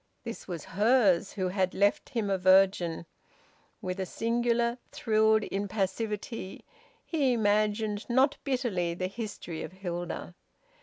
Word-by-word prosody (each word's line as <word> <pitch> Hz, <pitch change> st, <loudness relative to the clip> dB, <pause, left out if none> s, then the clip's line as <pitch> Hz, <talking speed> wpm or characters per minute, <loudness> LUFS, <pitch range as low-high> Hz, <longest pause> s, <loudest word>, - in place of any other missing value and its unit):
This 230 Hz, -, -7 dB
was 170 Hz, -5 st, -5 dB
hers, 205 Hz, -3 st, +3 dB
who 185 Hz, -3 st, -1 dB
had 185 Hz, -1 st, 0 dB
left 200 Hz, +1 st, +2 dB
him 225 Hz, -6 st, -1 dB
a 195 Hz, -, +2 dB
virgin. 185 Hz, -3 st, +4 dB, 0.8 s
With 185 Hz, +1 st, -3 dB
a 190 Hz, -, -1 dB
singular 235 Hz, +2 st, 0 dB
thrilled 220 Hz, -1 st, +3 dB
impassivity 205 Hz, +1 st, -3 dB, 0.4 s
he 280 Hz, -6 st, +1 dB
imagined, 210 Hz, -1 st, +1 dB
not 260 Hz, +4 st, +3 dB
bitterly, 225 Hz, -11 st, -1 dB
the 185 Hz, -, -2 dB
history 190 Hz, -5 st, -5 dB
of -, -, -7 dB
Hilda. 175 Hz, -2 st, -5 dB
205 Hz, 120 wpm, -29 LUFS, 185-230 Hz, 0.8 s, virgin